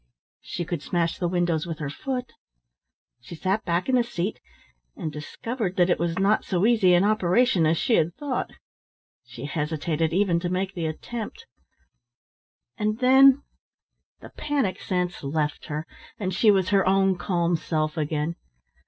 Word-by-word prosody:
She 175 - -5
could 170 -3 -3
smash 170 0 -1
the 175 - 0
windows 175 -2 0
with 165 -2 -4
her 145 -3 -4
foot. 255 - -4 0.9
She 130 +7 -10
sat 190 +6 -1
back 170 +1 0
in 260 - 0
the 250 -1 +4
seat, 210 -3 -3 0.6
and 155 - -4
discovered 190 - -4
that 175 0 +3
it - - +1
was 170 0 -1
not 200 +3 +2
so 185 0 0
easy 215 -6 +5
an 175 - +4
operation 205 -2 +3
as 160 +1 +2
she 245 - +1
had 165 +2 +1
thought. 285 -4 -3 0.8
She 125 +1 -9
hesitated 155 +2 -1
even 180 -1 +2
to 175 0 -3
make 185 +2 -2
the 170 -3 -2
attempt; 220 +8 -6 1.3
and 215 +1 0
then 265 +2 +6 0.8
the - - -11
panic 270 - -2
sense 180 -3 -2
left 150 +1 -2
her, 150 +1 -4 0.3
and 190 -4 -3
she 215 - +4
was 190 -3 +3
her 195 -1 +4
own 195 0 +3
calm 175 -1 0
self 155 -1 -2
again. 155 +1 -2
180 Hz, 160 wpm, -25 LUFS, 160-210 Hz, 1.3 s, then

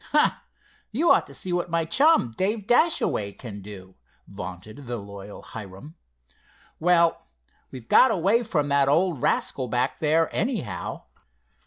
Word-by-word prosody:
"Huh! 300 - +5 0.6
you'd 310 +10 +2
ought - - +3
to - - -13
see 180 - -4
what 175 0 -1
my 165 -1 0
chum, 275 - +3
Dave 205 - -1
Dashaway, 240 - +2
can 105 -4 -9
do," 95 -2 -11 0.3
vaunted 100 +7 -9
the 120 0 -3
loyal 100 -1 -10
Hiram. 110 - -10 0.8
"Well, 170 - +2 0.4
we've 125 -3 -11
got 260 - +6
away 195 +7 +2
from 165 -11 -1
that 140 -1 +3
old 165 -2 +1
rascal 130 -2 0
back 125 +3 -1
there, 160 +1 +2
anyhow." 120 - -3
145 Hz, 140 wpm, -25 LUFS, -, 0.8 s, got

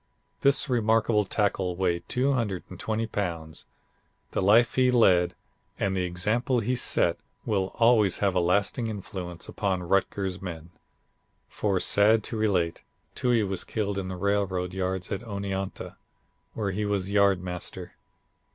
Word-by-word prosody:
This 140 +1 +4
remarkable 115 -3 +2
tackle 95 -3 0
weighed 85 -2 -1
220 115 -4 -1
pounds. 85 -7 -4 0.7
The - - -1
life 110 +5 +5
he 130 -1 +3
led 90 -8 +4 0.4
and 95 -1 0
the 95 - 0
example 115 +9 0
he 120 +4 0
set 125 - +1 0.3
will 100 -4 0
always 115 -5 +4
have 100 -2 +1
a 90 - +2
lasting 100 +6 +1
influence 90 -5 -6
upon 95 -3 -2
Rutgers 95 0 0
men. 85 -2 -7 0.8
For 100 -3 0
sad 105 +3 +4
to 115 - -4
relate, 95 -6 0 0.3
Toohey 120 -3 +1
was 95 -1 -3
killed 100 -3 -2
in 95 - -4
the 95 -1 -5
railroad 95 -2 -1
yards 95 -1 -3
at 100 - -2
Oneonta, 100 -3 -5 0.6
where 105 -3 -1
he 105 +3 -2
was 100 -2 -1
yard 100 -2 +4
master. 90 -1 -6
100 Hz, 135 wpm, -27 LUFS, 90-110 Hz, 0.8 s, life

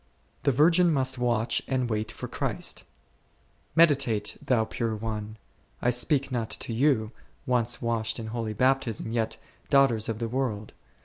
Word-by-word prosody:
W)t 140 - +5
Utrgtn 170 +4 +5
must 130 -3 0
toatcf) 120 -1 +1
anD 130 -2 0
toait 110 -1 -2
for - - -7
(£J)rist - - -3 0.9
Meditate, 135 -10 +3
thou 115 -4 +2
pure 115 0 -2
one, 110 0 -5 0.2
— - - -37
I 120 - +2
speak 135 +3 +2
not 115 -3 -2
to 115 - -4
you, 115 -3 +2 0.3
once 120 -1 +1
washed 115 -1 -1
in 115 - -5
holy 115 -2 -3
Baptism, 125 -2 0
yet, 115 -1 -1 0.3
daughters 135 -6 +3
of 110 - -2
the 115 +1 -2
world 115 -4 -3
120 Hz, 150 wpm, -27 LUFS, 110-135 Hz, 0.9 s, W)t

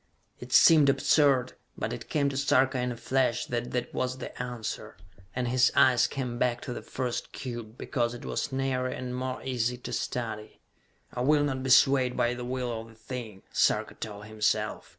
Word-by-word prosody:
It - - -10
seemed 155 -4 +7
absurd, 135 -1 +3 0.2
but - - -3
it - - -8
came 145 -2 +1
to 140 - -5
Sarka 130 -1 +2
in 125 0 -1
a 120 - -6
flash 125 -1 0
that 120 0 -3
that 125 -1 -3
was 130 0 -2
the 130 - -8
answer, 120 -3 -5 0.4
and 125 -1 -1
his 125 +1 +4
eyes 130 -2 +5
came 125 -3 -4
back 120 -1 +1
to 125 - -5
the - - -6
first 125 -2 -4
cube, 120 -3 -7
because 120 -3 -1
it 120 - -10
was - - -2
nearer 130 -1 -1
and 125 -1 -5
more 130 0 -4
easy 125 -1 -1
to 125 - -7
study. 110 -1 -4 0.5
"I 125 - -3
will 145 +3 +4
not 135 -2 -1
be 135 - -3
swayed 130 -1 +5
by 120 -1 +2
the 125 0 -6
will 125 -2 -3
of 115 - -12
the 115 - -16
thing," 110 -3 -8
Sarka - - +2
told 105 -1 -7
himself. 110 0 -1
125 Hz, 190 wpm, -28 LUFS, 120-130 Hz, 0.5 s, seemed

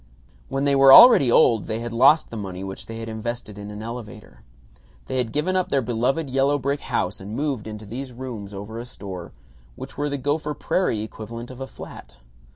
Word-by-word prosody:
When 135 +1 -1
they 140 -1 +3
were 135 0 +7
already 140 - +9
old 115 -2 +4
they 110 - -2
had 115 0 -5
lost 150 +7 +4
the - - -6
money, 95 -3 -6
which 95 0 -7
they 115 - -7
had 115 0 -6
invested 110 -1 -5
in 100 0 -8
an 105 +1 -8
elevator. 110 -3 -9 0.6
They 130 - -3
had 120 -3 -1
given 160 +8 -1
up 185 -1 0
their 135 -2 +1
beloved 125 +7 0
yellow 135 +2 +1
brick 140 +1 -2
house 100 -7 -2
and 100 +3 -7
moved 140 -6 -2
into 105 0 -8
these 125 +5 -6
rooms 120 -5 -7
over 105 +3 -7
a 120 - -6
store, 95 -6 -8 0.4
which - - -9
were 145 0 0
the 140 - -2
Gopher 145 +2 -2
Prairie 145 - 0
equivalent 115 +3 -8
of 130 +1 -11
a 135 - -4
flat. 60 - -11
120 Hz, 205 wpm, -23 LUFS, 110-140 Hz, 0.6 s, already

